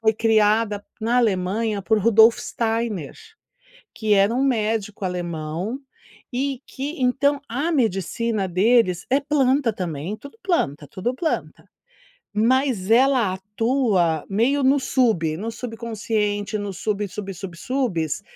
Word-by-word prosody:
foi 220 0 +3
criada 215 -1 +2 0.2
na 230 +3 +1
Alemanha 210 -1 0
por 220 +2 +2
Rudolf 225 +2 +5
Steiner, 225 - -2 0.8
que 215 -2 +1
era 200 +3 +4
um 255 - 0
médico 220 -5 -1
alemão 175 +3 -3 0.6
e 270 0 -2
que 280 +2 -5
então 280 +3 +2
a 285 +8 -1
medicina 220 - 0
deles 185 -1 +2
é 270 +2 +3
planta 275 -4 +2
também, 175 +1 -4
tudo 280 +10 -13
planta, 155 - -1
tudo 190 - -3
planta 320 +2 -3 0.7
mas 230 -3 +1
ela 245 -5 +4
atua 205 - 0
meio 245 +8 +2
no 275 +2 +4
sub 200 - +1
no 225 +4 -3
subconsciente 220 -3 -2
no 205 -1 -4
sub 205 +2 -2
sub 195 +1 -6
sub 180 -1 -8
subes 205 - -2
220 Hz, 125 wpm, -22 LUFS, 195-250 Hz, 0.8 s, Rudolf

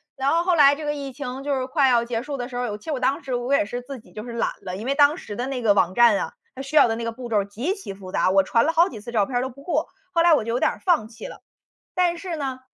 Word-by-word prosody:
然 270 0 0
后 335 +1 +3
后 360 -1 +2
来 285 -3 +7
这 310 - -8
个 295 0 -1
疫 280 -2 -6
情 265 0 -6
就 285 0 -1
是 260 -1 -1
快 275 -1 +3
要 240 -2 +3
结 230 -1 -2
束 285 0 -5
的 245 0 -5
时 250 - -9
候， 245 0 -1
有 210 -3 -4
其 210 - -20
实 320 - -3
我 270 - -2
当 260 +2 0
时 260 -2 -2
我 245 +3 -1
也 280 - +3
是 245 +4 -5
自 260 +1 -8
己 225 - -20
就 215 - -7
是 240 - -8
懒 235 - 0
了。 180 -1 -5
因 215 - -7
为 275 - +1
当 290 +1 +5
时 210 - -8
的 245 - -3
那 265 -2 -3
个 215 -3 +4
网 185 -2 +2
站 235 -1 +5
啊， - - -4 0.2
它 265 - -6
需 275 +3 -6
要 - - +8
的 225 - -1
那 230 - -5
个 230 - -2
步 240 +1 -8
骤 210 -3 +2
极 235 - -3
其 380 - -8
复 190 -1 -11
杂， 185 - +2
我 195 +1 +5
传 230 +4 +2
了 320 - +2
好 340 +3 +4
几 220 - -9
次 235 - -8
照 215 -4 +2
片 250 - -5
儿 - - +1
都 260 - -3
不 270 +2 -14
过， 320 -1 -1 0.2
后 335 - +3
来 340 -1 +6
我 290 - +3
就 230 - -3
有 245 - 0
点 - - +2
儿 - - -10
放 335 - +2
弃 240 - -10
了。 - - -11 0.5
但 355 -1 +2
是 345 -1 -5
呢 265 -3 -4
255 Hz, 370 characters per minute, -23 LUFS, 230-290 Hz, 0.5 s, 要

